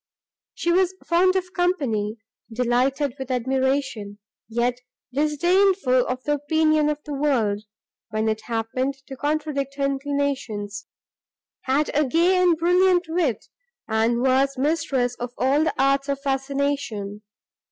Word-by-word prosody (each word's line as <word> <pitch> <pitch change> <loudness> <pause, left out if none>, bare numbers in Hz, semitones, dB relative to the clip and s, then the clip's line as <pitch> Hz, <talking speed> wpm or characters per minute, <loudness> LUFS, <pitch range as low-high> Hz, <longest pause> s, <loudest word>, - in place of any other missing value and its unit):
She 345 - 0
was 370 +1 +2
fond 365 +2 +3
of 365 -1 -2
company, 255 - 0 0.3
delighted 250 +4 +1
with 265 -1 -6
admiration, 260 -4 -1 0.3
yet 240 +2 0 0.3
disdainful 305 -1 +2
of 255 0 -3
the 295 - +1
opinion 310 +1 +2
of 300 - -1
the 300 - -5
world, 235 -8 0 0.4
when 215 0 -1
it 220 0 -1
happened 240 +4 -2
to 270 - -8
contradict 290 -1 -2
her 280 0 0
inclinations; 270 -7 -2 0.8
had 275 +3 +1
a 300 - +4
gay 350 +6 +3
and 350 -3 +4
brilliant 360 +2 +3
wit, 320 -8 0 0.4
and 230 +2 +1
was 270 +1 +2
mistress 265 -4 0
of 245 0 -5
all 275 +4 +2
the - - 0
arts 275 +1 +2
of 280 -1 -1
fascination. 270 -7 -2
275 Hz, 130 wpm, -23 LUFS, 245-305 Hz, 0.8 s, a